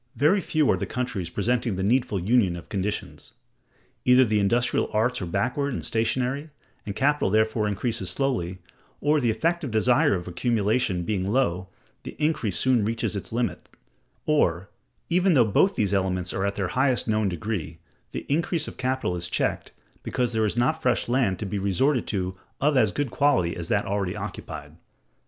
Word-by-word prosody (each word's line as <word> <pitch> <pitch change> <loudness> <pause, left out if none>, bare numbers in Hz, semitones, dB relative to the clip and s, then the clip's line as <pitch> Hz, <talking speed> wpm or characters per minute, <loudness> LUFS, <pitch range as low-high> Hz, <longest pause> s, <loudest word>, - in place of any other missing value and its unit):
Very 185 +8 +3
few 155 -4 +1
are - - +1
the - - -3
countries 125 -9 -3
presenting 115 +3 0
the 95 - -2
needful 120 -1 +1
union 100 -1 +2
of 85 - -10
conditions. 100 +1 -4 0.7
Either 125 +1 +6
the 110 -2 +1
industrial 120 +5 +1
arts 115 +2 +1
are 90 - -3
backward 125 +10 -1
and - - -4
stationary, 130 +6 0 0.4
and 100 - -4
capital 145 -2 +2
therefore 110 +1 +2
increases 105 -2 -2
slowly, 95 -6 -1 0.4
or, 150 +1 +2
the 120 - +2
effective 150 +7 0
desire 125 +6 +3
of 90 -1 -5
accumulation 105 -1 0
being 95 +1 -1
low, 95 -8 +1 0.3
the - - -9
increase 150 - 0
soon 130 -4 +3
reaches 115 0 -1
its 100 - -5
limit; 120 0 -2 0.6
or, 95 - +1 0.4
even 180 0 +3
though 120 -4 +6
both 190 - +3
these 100 -2 0
elements 95 -2 0
are 95 +1 0
at 100 - -2
their 95 -3 -2
highest 130 -1 +1
known 110 -2 +1
degree, 85 -4 -4 0.3
the - - -5
increase 160 +2 0
of - - -8
capital 130 -8 -1
is 85 0 -4
checked, - - -1 0.3
because 125 -1 -1
there 110 -1 +2
is 105 - -2
not 155 +7 +1
fresh 125 -1 +1
land 120 -6 +1
to 110 - -5
be 100 +1 -3
resorted 115 - +1
to 95 -3 -2 0.2
of 145 +1 +2
as 110 -6 +4
good 145 -4 -2
quality 135 -12 +2
as 85 -2 -5
that 100 +3 +1
already 100 -1 -2
occupied. 90 -7 -7
110 Hz, 175 wpm, -25 LUFS, 95-130 Hz, 0.7 s, Either